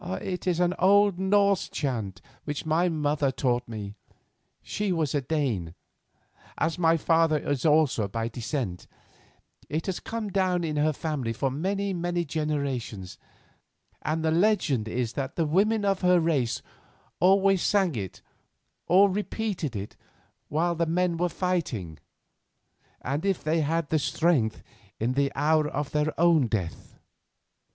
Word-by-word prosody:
"It 185 -1 -5
is 175 -2 +1
an 180 0 +2
old 200 0 +4
Norse 200 0 +2
chant 110 - -3 0.2
which 145 0 -4
my 165 +3 +2
mother 150 -3 0
taught 125 -2 0
me; 105 -3 -6 0.7
she 210 -2 -2
was 160 -5 0
a 145 - +1
Dane, 125 - -2 0.8
as 165 +2 -1
my 165 -1 +4
father 165 -1 +3
is 145 0 -1
also 150 -8 +3
by 115 +3 -3
descent. 115 - -4 0.8
It 155 +2 -2
has 190 - -2
come 225 -2 -4
down 185 -2 +1
in 155 -2 -2
her 155 +1 +3
family 145 -6 -3
for 135 +3 -1
many, 195 +7 -1
many 175 0 -1
generations, 140 - -3 0.8
and 160 +1 -1
the 160 - +2
legend 170 - +2
is 120 +1 -2
that 140 -1 -4
the 165 - +1
women 205 +7 +2
of 195 -1 +1
her 180 -1 +5
race 150 -8 0 0.6
always 195 0 +4
sang 195 -5 +2
it 95 -5 -6 0.6
or 190 +4 +6
repeated 200 - -3
it 100 +1 -6 0.5
while 170 +4 0
the 170 0 -1
men 175 +1 +1
were 175 +1 0
fighting, 135 - -2 1.0
and, 140 +4 -2
if 195 -2 0
they 160 +1 +1
had 160 +1 -1
the 160 - +2
strength, 145 -5 +1 0.4
in 120 +3 0
the 140 +1 +1
hour 155 0 +2
of 145 0 -3
their 150 +1 +1
own 165 -6 +4
death. 100 -7 -4
155 Hz, 145 wpm, -27 LUFS, 135-180 Hz, 1.0 s, or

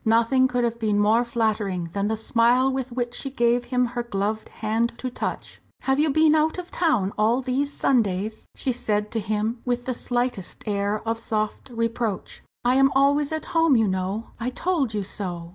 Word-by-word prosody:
Nothing 230 +4 +4
could 250 -1 0
have 235 0 -1
been 215 -2 +1
more 215 +3 +4
flattering 210 -7 -1
than 200 0 0
the 220 +1 -1
smile 240 +4 +3
with 260 -1 -3
which 240 0 -2
she 275 - -4
gave 240 -2 +1
him 250 0 +1
her 240 0 -3
gloved 215 -1 -2
hand 225 +2 -1
to 255 0 -4
touch. - - -5 0.2
"Have 270 +1 +1
you 310 +1 +3
been 310 +2 +4
out 315 +2 +2
of 360 -1 -7
town 245 - +1
all 225 +4 +3
these 265 +2 -1
Sundays?" 215 -6 0
she 260 - -1
said 210 -4 -1
to 225 - -1
him, 215 +3 -2
with 245 -1 -1
the 255 - -1
slightest 245 -5 -3
air 205 +1 -1
of 225 0 0
soft 215 +2 -3
reproach. 230 -3 -2 0.2
"I 250 +2 +4
am 270 0 +5
always 285 +2 +3
at 315 -1 -3
home, 325 -4 +4
you 225 -2 +3
know 190 +4 -2
I 235 +2 -1
told 275 -5 -1
you 205 - -1
so!" 175 -4 -5
235 Hz, 195 wpm, -24 LUFS, 215-260 Hz, 0.2 s, am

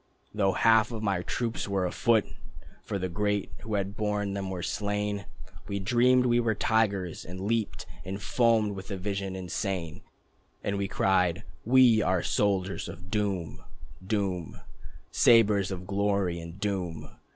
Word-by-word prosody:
Though 100 -2 +2
half 115 0 +4
of 110 -2 -5
my 100 -4 +1
troops 115 +6 -3
were 100 -2 0
afoot, 110 +4 +2 0.6
(For - - -3
the 95 -1 -2
great 105 +3 -1
who 110 -2 -4
had 100 0 -2
borne 105 -2 -1
them 100 -1 -3
were 90 -2 -4
slain) 105 0 -2 0.4
We 100 - -2
dreamed 120 +5 +3
we 120 -1 +3
were 115 -2 +1
tigers, 100 -6 0
and 90 +2 -8
leaped 110 +2 -1 0.2
And 95 +2 -5
foamed 115 0 +2
with 95 0 -8
that 100 - -4
vision 95 0 -3
insane. 90 -2 -3 0.6
We 100 0 -1
cried 95 -1 +1 0.2
"We 120 -2 +6
are 95 -4 +1
soldiers 100 -2 0
of 90 +1 -10
doom, 100 -6 -2 0.4
Doom, 95 -4 -2 0.5
Sabres 105 -5 +5
of 90 -2 -5
glory 100 -3 0
and 85 +2 -9
doom." 95 -5 -3
100 Hz, 145 wpm, -28 LUFS, 95-110 Hz, 0.6 s, We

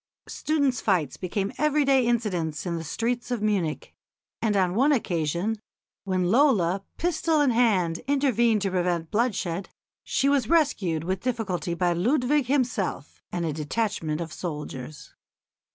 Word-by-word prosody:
Students' 285 -5 0
fights 175 -9 +1
became 195 +2 -3
everyday 275 -4 +3
incidents 185 -11 -1
in 175 -2 -2
the 165 - -4
streets 235 +10 -2
of 240 -4 -2
Munich, 195 -7 -1 0.5
and 210 -3 +1
on 185 -2 +2
one 270 +8 +3
occasion 180 - 0 0.5
when 185 -2 0
Lola, 200 - +3
pistol 330 -2 +1
in 285 -3 +4
hand, 195 -9 +2
intervened 240 -6 +2
to 195 - 0
prevent 175 -3 -1
bloodshed, 200 -6 -1 0.3
she 275 - 0
was 275 -5 +2
rescued 205 - +2
with 185 +2 -2
difficulty 205 -8 -2
by 175 0 +1
Ludwig 250 - +1
himself 250 - -1
and 175 -1 -2
a 155 - -1
detachment 160 0 -2
of 160 -1 -6
soldiers. 150 -3 -7
205 Hz, 135 wpm, -26 LUFS, 175-250 Hz, 0.5 s, in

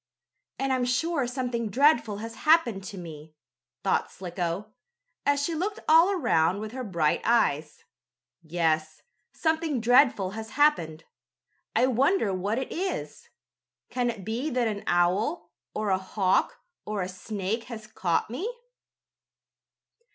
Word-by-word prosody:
"And 270 0 0
I'm 255 -1 +1
sure 275 +2 0
something 245 -3 -2
dreadful 235 -4 +3
has 230 - -7
happened 305 -11 +3
to 195 - -7
me!" 155 -3 -10 0.5
thought - - +1
Slicko, 180 +3 -4 0.5
as 285 0 +3
she 335 - -1
looked 395 +7 -2
all 325 +4 +7
around 200 - +2
with 215 0 -6
her 255 +1 -5
bright 170 -8 0
eyes. 155 -10 +1 0.6
"Yes, 155 -2 -1 0.3
something 320 -4 0
dreadful 240 -5 +4
has 220 +2 -7
happened. 165 - +2 0.7
I - - +4
wonder 260 - +2
what 200 +4 -1
it 265 - -3
is. 375 +2 -4 0.6
Can 245 -1 0
it 215 -6 -6
be 240 +7 -2
that 245 -4 +1
an 205 -2 -3
owl, 185 - +1 0.2
or 210 -2 -1
a 190 - +2
hawk 190 0 +1 0.3
or 210 -2 -3
a - - -3
snake 200 +4 -4
has 225 -3 -8
caught 180 -6 -1
me?" 340 - -3
220 Hz, 135 wpm, -27 LUFS, 185-265 Hz, 0.7 s, all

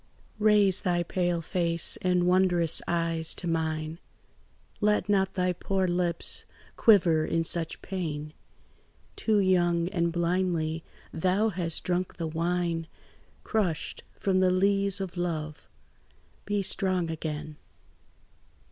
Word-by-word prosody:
"Raise 210 -3 +4
thy 175 -3 +1
pale 175 -1 -1
face 170 -1 0
and 180 -1 +2
wondrous 180 -2 +3
eyes 165 -1 0
to - - -6
mine; 160 -1 -2 0.8
Let 210 0 +2
not 195 -2 +1
thy 180 -1 +1
poor 190 +1 -1
lips 175 -1 +1 0.3
quiver 170 -8 +5
in 165 +1 0
such 165 0 -1
pain; 155 -5 -4 0.8
Too 220 -2 +1
young 175 -3 +2
and 170 -3 0
blindly 170 -2 0 0.3
thou 185 +6 +1
hast 170 -4 -3
drunk 180 0 -2
the 170 - -3
wine 165 0 -1 0.6
Crushed 180 -8 -2
from 190 -1 +1
the 185 0 +4
lees 195 +1 +2
of 190 -2 -5
love. 155 -3 -4 0.8
Be 205 -1 -1
strong 185 -3 +1
again. 155 -1 -5
175 Hz, 115 wpm, -28 LUFS, 165-190 Hz, 0.8 s, quiver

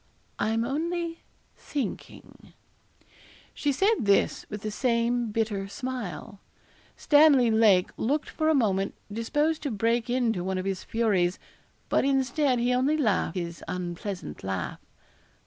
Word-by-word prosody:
'I'm 225 +2 +1
only 335 +5 -2 0.4
thinking.' 275 -8 -7 1.0
She 290 - 0
said 390 +11 +3
this 200 -2 +2
with 210 -1 -6
the 215 - -3
same 235 0 0
bitter 210 -3 -1
smile. 205 - -6 0.6
Stanley 290 -6 +5
Lake 215 -5 +4
looked 285 +6 0
for 315 0 0
a 315 - +4
moment 195 -6 +1 0.2
disposed 295 +8 0
to 295 - -2
break 230 +2 0
into 235 -7 0
one 190 0 -2
of 185 - -3
his 195 -2 -2
furies, 195 -6 +1 0.5
but - - +2
instead 270 0 +1
he 245 +1 +1
only 265 +5 +2
laughed 215 -8 0
his 170 -1 -5
unpleasant 180 +2 -5
laugh. 95 -2 -3
230 Hz, 130 wpm, -27 LUFS, 195-270 Hz, 1.0 s, Stanley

